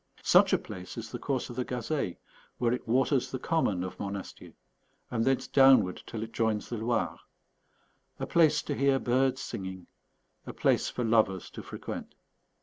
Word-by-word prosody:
Such - - +6
a - - +5
place 90 +3 -9
is 115 -1 -6
the 120 - -5
course 130 -2 -2
of - - -9
the 125 - -1
Gazeille, 125 - -2 0.4
where 120 -1 +1
it 125 - -4
waters 130 +2 +2
the 130 - -3
common 125 - 0
of 95 - -7
Monastier 100 -1 -6 0.6
and 115 -2 0
thence 135 0 +2
downward 135 -9 +5
till 110 -2 -4
it 110 - -7
joins 110 -2 -1
the 120 - -3
Loire; 115 +2 -1 1.0
a - - -2
place 155 -3 +3
to 145 - -3
hear 140 -1 +3
birds 130 +1 +1
singing; 95 -2 -6 0.6
a - - -5
place - - +2
for 125 - -3
lovers 110 -5 +2
to - - -8
frequent. - - -7
120 Hz, 170 wpm, -29 LUFS, 105-135 Hz, 1.0 s, Such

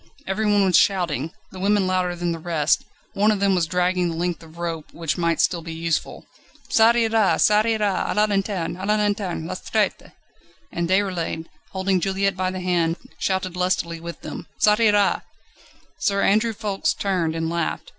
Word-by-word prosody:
Everyone 205 0 +2
was 185 -2 +2
shouting; 165 -6 +1 0.2
the 185 - -9
women 200 0 +2
louder 185 -1 0
than 175 0 -2
the 165 - -4
rest; 160 -2 +1 0.3
one 205 +2 +3
of 210 -2 +2
them 200 0 +3
was 175 -3 +1
dragging 180 0 +1
the 165 - -4
length 175 +1 -2
of 165 0 -15
rope, 165 -2 -4
which 165 -3 -2
might 170 -2 0
still 175 -2 +2
be 165 0 -7
useful. 165 0 -2 0.5
"Ça 225 +1 +5
ira! 225 -3 +3
ça 210 0 +4
ira! 215 -4 0
A - - -2
la 210 0 +4
lanterne! 195 -4 -1
A 190 - -5
la 210 - +3
lanterne! 205 -5 -1
les 185 +2 -5
traîtres!" 215 -2 0 0.6
And 170 0 -2
Déroulède, 185 -4 0 0.2
holding 190 0 0
Juliette 195 +1 0
by 185 0 -1
the 185 0 -5
hand, 170 -2 +1 0.2
shouted 190 -2 -1
lustily 180 -2 -1
with 170 -1 -8
them: - - -7
"Ça 210 +1 +4
ira!" 205 -3 +3 0.8
Sir 200 -1 +1
Andrew 220 +3 +3
Ffoulkes 205 -3 -1
turned, 175 -5 0
and 165 0 -1
laughed. 170 0 -2
185 Hz, 180 wpm, -23 LUFS, 170-205 Hz, 0.8 s, Ça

